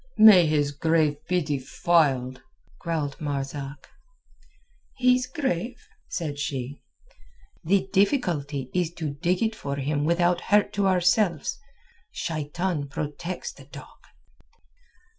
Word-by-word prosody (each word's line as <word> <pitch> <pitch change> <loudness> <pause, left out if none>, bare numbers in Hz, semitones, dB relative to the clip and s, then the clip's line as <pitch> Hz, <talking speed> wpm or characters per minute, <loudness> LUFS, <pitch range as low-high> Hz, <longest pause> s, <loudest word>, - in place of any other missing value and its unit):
"May 195 -6 +8
his 145 -2 +1
grave 155 0 +1
be 180 -1 +1
defiled!" 135 -2 +1 0.4
growled 155 -5 -3
Matzak. 140 -1 -4 1.1
"His 250 0 +3
grave?" 255 - -2 0.3
said 150 -4 -4
she. 140 -1 -4 0.8
"The 190 +3 +2
difficulty 155 - 0
is 175 -2 0
to 155 -4 -3
dig 175 +7 0
it 225 0 0
for 140 -8 -4
him 145 +1 -1
without 175 +2 +2
hurt 210 -1 +2
to 200 -1 +1
ourselves. 185 - +2 0.5
Shaitan 160 0 -3
protects 150 +5 -5
the - - -15
dog." - - -13
160 Hz, 105 wpm, -25 LUFS, 145-185 Hz, 1.1 s, May